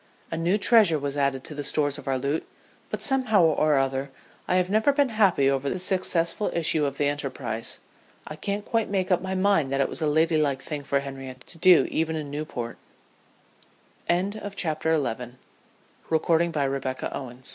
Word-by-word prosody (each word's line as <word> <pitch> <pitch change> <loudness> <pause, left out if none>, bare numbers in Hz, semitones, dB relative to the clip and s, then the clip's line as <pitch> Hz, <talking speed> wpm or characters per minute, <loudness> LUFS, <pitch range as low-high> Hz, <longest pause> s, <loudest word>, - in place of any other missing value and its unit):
A - - -2
new 170 +5 +1
treasure 210 -6 +5
was 140 -1 -4
added 140 -2 0
to - - -7
the 145 0 -5
stores 145 0 +2
of - - -13
our 135 -1 +1
loot, 140 +4 -2 0.4
but - - -4
somehow 255 -8 +2
or 155 -2 +3
other 135 0 -1 0.4
I 180 - +1
have 180 0 +2
never 220 +6 +4
been 280 -1 +2
happy 195 - +3
over 135 0 +1
the - - -2
successful 185 0 0
issue 160 -3 +2
of 140 0 -5
the 145 - +1
enterprise. 135 -5 -3 0.5
I 155 - -7
can't 200 +6 -4
quite 225 -2 0
make 190 -1 -1
up 180 - +3
my 190 0 -3
mind 185 -8 +2
that 135 - 0
it 135 - +2
was - - -5
a 155 - +1
lady 160 +2 +2
like 140 -3 +1
thing 150 -2 -5
for 140 0 0
Henriette 135 -2 -8
to 165 - -13
do 180 0 +6
even 160 0 0
in 150 -3 -5
Newp 145 -6 -5
155 Hz, 165 wpm, -25 LUFS, 140-185 Hz, 0.5 s, do